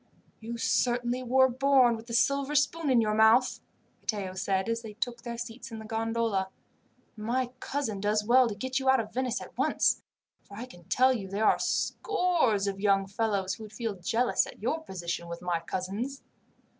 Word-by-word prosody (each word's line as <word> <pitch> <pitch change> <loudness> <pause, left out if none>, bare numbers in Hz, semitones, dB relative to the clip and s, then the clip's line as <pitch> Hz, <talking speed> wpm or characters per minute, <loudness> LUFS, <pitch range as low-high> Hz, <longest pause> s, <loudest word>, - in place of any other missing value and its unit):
"You 230 +1 -6
certainly 245 +1 +1
were 260 +1 +4
born 260 -1 +4
with 225 +1 -11
a - - -5
silver 275 +4 +2
spoon 300 +1 +1
in 245 -3 +5
your 215 -1 +1
mouth," 220 +4 +4 0.4
Matteo 200 -4 -3
said 190 +1 -1
as 230 0 -1
they 220 -2 -9
took 235 +1 -4
their 235 0 -6
seats 235 +1 -7
in 225 - -6
the 220 - -8
gondola, 225 -3 -1 0.7
"and 215 - -9
my 245 +2 -1
cousin 260 -9 -3
does 210 +1 +1
well 250 +2 +5
to 205 - -5
get 260 +5 -2
you 265 0 +1
out 265 0 +5
of 220 -2 -5
Venice 255 -1 -1
at - - -11
once, - - +2 0.4
for 200 - -13
I 235 - -5
can 175 -9 -16
tell 260 +6 +4
you 205 -6 -4
there 200 +3 -1
are - - +4
scores 345 - +1
of 195 -1 -3
young 195 -1 +3
fellows 200 -2 -1
who 220 - -8
would 215 -1 -11
feel 225 -1 -3
jealous 225 +7 +1
at - - -12
your 315 +7 0
position 170 - -5
with 170 +1 -7
my 175 -2 0
cousins." 195 +10 -4
230 Hz, 195 wpm, -29 LUFS, 200-255 Hz, 0.7 s, in